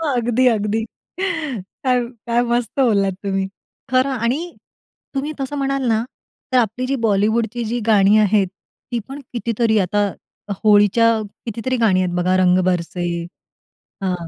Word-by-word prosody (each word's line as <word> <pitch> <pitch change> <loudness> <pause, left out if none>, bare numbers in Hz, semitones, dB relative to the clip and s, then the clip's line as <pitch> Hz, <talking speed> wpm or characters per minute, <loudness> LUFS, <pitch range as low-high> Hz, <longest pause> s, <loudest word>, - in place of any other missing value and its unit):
अगदी, 245 +1 +2
अगदी, 220 -1 +1 0.4
काय 265 - -1 0.3
काय 235 0 +2
मस्त 240 -2 0
बोललात 205 -7 +3
तुम्ही, 195 -1 -1 0.4
खरं 255 +1 +3
आणि 245 +3 0 0.8
तुम्ही 285 +3 -1
तसं 270 +2 -3
म्हणाल 275 -1 -1
ना, 225 0 +2 0.5
तर 255 - +3
आपली 240 +1 +1
जी 275 - 0
बॉलिवूडची 220 +3 +1
जी 235 +3 -2
गाणी 210 -1 +5
आहेत, 205 -2 +3 0.4
ती 240 - 0
पण 270 +2 -7
कितीतरी. 230 -1 +1
आता 200 +2 +1 0.5
होळीची 205 +1 +5 0.4
कितीतरी 235 +3 -2
गाणी 205 -6 +3
आहेत 180 -1 -1
बघा, 180 +1 +2
रंग 185 0 +4
बरसे 175 -1 -1 1.0
हां, 180 -3 -2
225 Hz, 135 wpm, -20 LUFS, 200-250 Hz, 1.0 s, गाणी